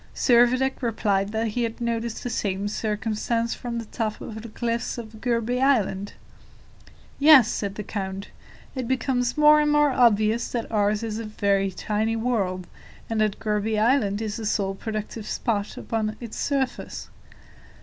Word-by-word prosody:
Servadac 255 Hz, +2 st, +3 dB
replied 205 Hz, -4 st, 0 dB
that 220 Hz, +1 st, -1 dB
he 240 Hz, +3 st, -2 dB
had 230 Hz, -1 st, -2 dB
noticed 235 Hz, -1 st, -2 dB
the 245 Hz, -, -3 dB
same 200 Hz, -2 st, -1 dB
circumstance 220 Hz, +2 st, -1 dB
from 240 Hz, -2 st, -5 dB
the 230 Hz, -, -4 dB
top 215 Hz, -1 st, -3 dB
of 220 Hz, 0 st, -7 dB
the 230 Hz, -, -9 dB
cliffs 235 Hz, +2 st, -2 dB
of 220 Hz, -2 st, -9 dB
Gourbi 240 Hz, +1 st, 0 dB
Island. 205 Hz, -7 st, +1 dB, 1.1 s
"Yes," 280 Hz, -5 st, +8 dB
said 200 Hz, -4 st, -3 dB
the 210 Hz, -, -5 dB
count; 195 Hz, -1 st, -5 dB, 0.4 s
"it 255 Hz, -3 st, -4 dB
becomes 250 Hz, 0 st, 0 dB
more 300 Hz, 0 st, +7 dB
and 300 Hz, 0 st, +2 dB
more 295 Hz, -1 st, +4 dB
obvious 230 Hz, -2 st, +3 dB
that 235 Hz, -2 st, -3 dB
ours 210 Hz, 0 st, +1 dB
is 220 Hz, -1 st, -3 dB
a -, -, -4 dB
very 200 Hz, -2 st, +1 dB
tiny 215 Hz, +4 st, -1 dB
world, 205 Hz, -6 st, -1 dB, 0.5 s
and 220 Hz, -1 st, +1 dB
that 215 Hz, -2 st, +1 dB
Gourbi 215 Hz, 0 st, -1 dB
Island 220 Hz, -2 st, +2 dB
is 215 Hz, -1 st, -3 dB
the 225 Hz, -, -5 dB
sole 195 Hz, -2 st, 0 dB
productive 215 Hz, +1 st, -5 dB
spot 205 Hz, -3 st, -2 dB
upon 215 Hz, -1 st, -2 dB
its 235 Hz, -3 st, -8 dB
surface. 270 Hz, -3 st, -2 dB
225 Hz, 160 wpm, -25 LUFS, 210-240 Hz, 1.1 s, Yes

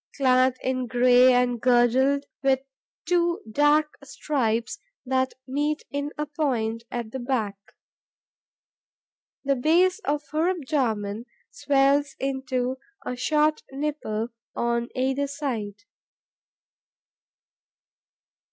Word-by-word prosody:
clad 255 Hz, -1 st, +3 dB
in 255 Hz, -1 st, -1 dB
grey 250 Hz, +1 st, +5 dB
and 245 Hz, -2 st, +2 dB
girdled 255 Hz, +3 st, +3 dB, 0.2 s
with 270 Hz, -1 st, +3 dB, 0.5 s
two 345 Hz, 0 st, +1 dB
dark 295 Hz, +4 st, +2 dB
stripes 250 Hz, -, -2 dB, 0.3 s
that 260 Hz, 0 st, 0 dB
meet 295 Hz, +3 st, -1 dB
in 285 Hz, +1 st, -2 dB
a 300 Hz, -, -1 dB
point 250 Hz, -7 st, -1 dB
at 235 Hz, -2 st, -5 dB
the 265 Hz, -, -5 dB
back. 240 Hz, -5 st, -1 dB, 1.9 s
The 275 Hz, 0 st, +1 dB
base 345 Hz, -, +3 dB
of 295 Hz, -6 st, -2 dB
her 315 Hz, +3 st, +1 dB
abdomen 240 Hz, -, -2 dB, 0.2 s
swells 280 Hz, 0 st, +2 dB
into 265 Hz, -1 st, -2 dB, 0.3 s
a 250 Hz, -, -3 dB
short 305 Hz, +4 st, +1 dB
nipple 270 Hz, -6 st, -3 dB, 0.3 s
on 235 Hz, 0 st, -1 dB
either 265 Hz, +2 st, 0 dB
side. 230 Hz, -9 st, -4 dB
265 Hz, 95 wpm, -25 LUFS, 245-290 Hz, 1.9 s, grey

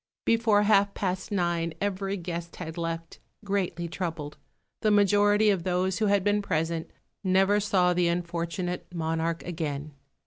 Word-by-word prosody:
Before 225 Hz, -3 st, +3 dB
half 200 Hz, -1 st, +3 dB
past 185 Hz, 0 st, -2 dB
nine 170 Hz, -4 st, 0 dB
every 195 Hz, 0 st, -2 dB
guest 170 Hz, -1 st, -5 dB
had 160 Hz, -3 st, -6 dB
left, 165 Hz, -1 st, -4 dB, 0.3 s
greatly 185 Hz, -4 st, -1 dB
troubled. 165 Hz, -3 st, -4 dB, 0.5 s
The 215 Hz, -, +3 dB
majority 205 Hz, +1 st, +4 dB
of 190 Hz, -3 st, 0 dB
those 185 Hz, +2 st, 0 dB
who 215 Hz, -, +2 dB
had 200 Hz, -1 st, +3 dB
been 205 Hz, +1 st, +2 dB
present 165 Hz, -3 st, -1 dB, 0.3 s
never 195 Hz, +2 st, +3 dB
saw 185 Hz, -3 st, +2 dB
the 175 Hz, 0 st, +2 dB
unfortunate 170 Hz, +1 st, -3 dB
monarch 165 Hz, 0 st, -2 dB
again. 155 Hz, -4 st, -4 dB
180 Hz, 140 wpm, -27 LUFS, 170-200 Hz, 0.5 s, majority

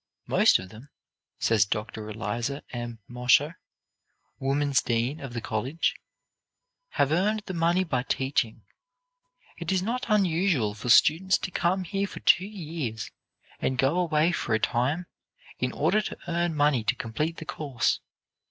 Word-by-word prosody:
"Most -, -, +5 dB
of 90 Hz, 0 st, -9 dB
them," 115 Hz, +8 st, -13 dB, 0.5 s
says 110 Hz, -3 st, +3 dB
Dr. 105 Hz, +1 st, -4 dB
Eliza 115 Hz, +6 st, -3 dB
M. 120 Hz, -1 st, -5 dB
Mosher, 125 Hz, +6 st, +2 dB, 0.8 s
woman's 140 Hz, 0 st, +1 dB
dean 120 Hz, +6 st, -1 dB
of 135 Hz, -3 st, -7 dB
the 120 Hz, -, -3 dB
college, 125 Hz, +10 st, -1 dB, 1.0 s
"have 140 Hz, 0 st, +3 dB
earned 205 Hz, +6 st, +1 dB
the 190 Hz, -, -5 dB
money 170 Hz, +2 st, +2 dB
by 130 Hz, -8 st, -1 dB
teaching. 130 Hz, -3 st, -1 dB, 1.0 s
It 170 Hz, 0 st, -3 dB
is 185 Hz, -1 st, +1 dB
not 240 Hz, +5 st, -2 dB
unusual 175 Hz, -, +2 dB
for 110 Hz, +4 st, -6 dB
students 175 Hz, +9 st, +5 dB
to 185 Hz, -, -5 dB
come 185 Hz, +2 st, +1 dB
here 195 Hz, +3 st, -2 dB
for -, -, -9 dB
two 190 Hz, +1 st, +4 dB
years 155 Hz, -, -5 dB, 0.5 s
and 130 Hz, -, -1 dB
go 135 Hz, +7 st, +2 dB
away 165 Hz, -1 st, +2 dB
for 120 Hz, -9 st, 0 dB
a -, -, +1 dB
time, 135 Hz, +11 st, 0 dB, 0.5 s
in 125 Hz, 0 st, 0 dB
order 180 Hz, +9 st, +2 dB
to -, -, -6 dB
earn 170 Hz, -1 st, 0 dB
money 145 Hz, -5 st, +3 dB
to 130 Hz, -, +2 dB
complete 150 Hz, +9 st, -3 dB
the 160 Hz, -, -7 dB
course. 140 Hz, -6 st, -1 dB
145 Hz, 150 wpm, -27 LUFS, 120-175 Hz, 1.0 s, Most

